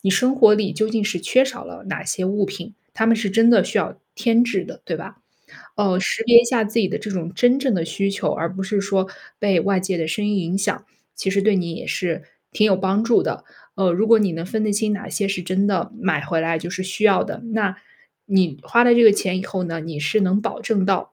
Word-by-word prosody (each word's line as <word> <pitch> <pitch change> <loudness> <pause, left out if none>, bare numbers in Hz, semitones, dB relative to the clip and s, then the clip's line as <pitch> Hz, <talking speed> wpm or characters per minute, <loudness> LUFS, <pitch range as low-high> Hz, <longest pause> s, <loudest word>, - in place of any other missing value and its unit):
你 195 - -2
生 255 +7 +2
活 220 -5 +6
里 205 -2 -1
究 215 +5 -1
竟 220 -1 -1
是 185 -5 -2
缺 260 +1 +3
少 255 -2 -7
了 - - -11
哪 - - -4
些 185 - -2
物 195 +1 0
品， 200 +3 -8 0.2
它 220 - 0
们 230 - +5
是 215 -2 -2
真 225 +4 +4
的 235 - +5
需 - - -4
要 - - -1 0.2
添 235 0 +3
置 245 - -1
的， - - -11
对 - - -3
吧？ - - -10 0.6
嗯， 195 -3 +1
识 195 - -1
别 235 0 +8
一 - - -2
下 235 -3 +1
自 220 +3 -2
己 195 - +2
的 - - -3
这 215 0 -7
种 175 -3 -4
真 245 +6 +3
正 265 -6 0
的 165 -3 -1
需 195 +5 -2
求， 195 - -2
而 165 +1 -3
不 190 +1 -5
是 200 +1 -1
说 195 -1 0 0.3
被 195 -4 +2
外 195 +2 +1
界 185 -1 -2
的 160 -1 -2
声 205 +6 -2
音 210 -1 0
影 180 +1 -2
响， 200 +1 -2 0.3
其 195 - -4
实 200 0 +1
对 215 0 +3
你 170 -2 -2
也 - - -8
是 175 -3 -2 0.3
挺 215 - +3
有 195 - +4
帮 195 +3 0
助 230 0 +3
的。 - - -4 0.3
嗯， 190 -2 +2
如 215 +5 +1
果 230 0 +6
你 200 -4 0
能 165 +1 -5
分 215 +4 -2
得 210 - 0
清 210 +1 0
哪 200 - -5
些 205 - -2
是 190 -2 -3
真 185 +3 0
的 195 0 -1
买 200 -4 0
回 165 -3 -1
来 165 0 0
就 175 - -7
是 185 - -4
需 190 +3 -4
要 200 -3 +4
的， 220 - -7
那， 205 -4 0 0.5
你 185 -8 +1
花 235 +1 +3
了 240 - +6
这 235 - +5
个 220 - +10
钱 185 -2 -1
以 185 - -5
后 190 -1 -4
呢， 165 -1 -5
你 160 -1 -7
是 155 +8 +1
能 190 +1 +2
保 - - -4
证 200 -5 0
到， 195 -1 -1
200 Hz, 285 characters per minute, -21 LUFS, 185-220 Hz, 0.6 s, 个